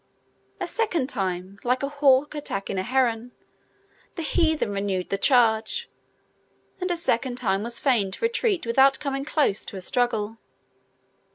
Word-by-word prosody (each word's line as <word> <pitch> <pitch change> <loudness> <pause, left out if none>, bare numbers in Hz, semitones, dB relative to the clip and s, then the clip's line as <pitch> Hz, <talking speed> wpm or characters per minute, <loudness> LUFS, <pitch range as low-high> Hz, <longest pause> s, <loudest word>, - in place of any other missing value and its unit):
A - - -2
second 350 - -1
time, 190 -4 -3
like 250 +2 0
a - - +1
hawk 285 0 +3
attacking 200 -10 -3
a - - +1
heron, 245 +1 0 0.8
the 330 - -4
heathen 315 -7 +1
renewed 195 -2 -2
the 195 - +1
charge, 240 - +2 0.9
and 365 0 -2
a 350 - 0
second 245 -6 0
time 200 -6 0
was 235 +2 0
fain 235 -8 +2
to 190 - -3
retreat 460 - 0
without 270 +4 +4
coming 275 -2 -3
to - - -9
a - - -10
close 280 -10 +1 0.2
struggle. 225 -3 0
250 Hz, 150 wpm, -25 LUFS, 210-290 Hz, 0.9 s, without